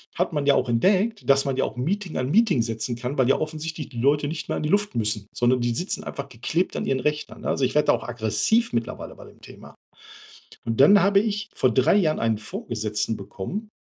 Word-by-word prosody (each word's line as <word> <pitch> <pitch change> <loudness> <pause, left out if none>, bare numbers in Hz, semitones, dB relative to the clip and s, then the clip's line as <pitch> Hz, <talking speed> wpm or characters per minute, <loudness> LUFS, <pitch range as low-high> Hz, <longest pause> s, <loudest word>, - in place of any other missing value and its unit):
hat 180 0 0
man 145 -2 -1
ja 140 - +5
auch 125 - 0
entdeckt, 195 - +1
dass 135 0 +5
man 135 -1 -1
ja - - +2
auch - - -6
Meeting 180 +8 -3
an 130 +1 -1
Meeting 205 - +4
setzen 115 +1 -3
kann, 125 +4 -5
weil 130 -2 +3
ja 135 - +4
offensichtlich 155 0 -5
die 120 -3 -7
Leute 145 +3 +2
nicht 160 - -5
mehr - - -2
an - - -3
die 150 - -1
Luft 205 -6 +1
müssen, 105 -2 -1
sondern 125 +1 +2
die 120 -1 0
sitzen 180 +11 -3
einfach 140 0 -6
geklebt 155 +10 -2
an - - -2
ihren 130 -1 0
Rechnern, 150 +1 -3
ne? - - -3
Also, 135 - +1
ich 130 - -3
werde 150 0 +3
da - - +6
auch 115 -1 -3
aggressiv 120 - +1
mittlerweile 115 -1 -4
bei - - -13
dem - - -18
Thema. - - -14 0.9
Und 115 +2 -2
dann 195 +8 +7
habe 200 +1 +4
ich 205 -1 -2
vor 130 - +2
3 130 - +3
Jahren 160 -6 +2
einen 115 -2 +1
Vorgesetzten 110 0 -3
bekommen, 175 - -6
140 Hz, 235 wpm, -24 LUFS, 120-180 Hz, 0.9 s, dann